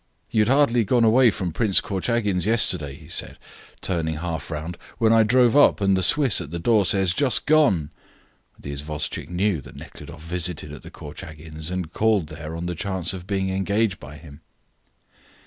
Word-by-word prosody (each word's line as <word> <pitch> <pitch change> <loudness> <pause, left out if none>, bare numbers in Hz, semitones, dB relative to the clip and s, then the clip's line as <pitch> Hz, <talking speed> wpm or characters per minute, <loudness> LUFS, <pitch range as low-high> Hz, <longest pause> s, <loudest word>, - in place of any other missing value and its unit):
"You 110 - +3
had 105 - +2
hardly 125 -3 +3
gone 120 +3 +2
away 120 +2 +5
from 90 -5 -3
Prince 105 -2 +3
Korchagin's 100 -1 -1
yesterday," 90 -11 +1
he - - -15
said, - - -4 0.4
turning 80 -4 -1
half 80 +1 -5
round, 80 +2 -5 0.2
"when 115 -1 +3
I 115 - +6
drove 120 +2 +4
up, 145 -7 +5
and 100 -1 +2
the 95 - 0
Swiss 135 - +3
at 70 - -7
the 85 - -5
door 100 +2 +2
says, 95 -3 +1
'just 135 -1 0
gone.'" 135 - +3 0.7
The 70 - -8
isvostchik 75 +2 -5
knew 90 -2 0
that - - -13
Nekhludoff 80 - -11
visited 85 -3 -3
at 75 - -10
the - - -11
Korchagins, 80 0 -8
and 90 -3 -4
called 105 -8 +1
there 80 +1 -7
on 85 +1 -5
the 90 - -2
chance 95 0 -3
of 90 -1 -8
being 95 -1 -1
engaged 100 0 0
by 70 +3 -11
him. 75 -1 -14
95 Hz, 180 wpm, -23 LUFS, 80-110 Hz, 0.7 s, I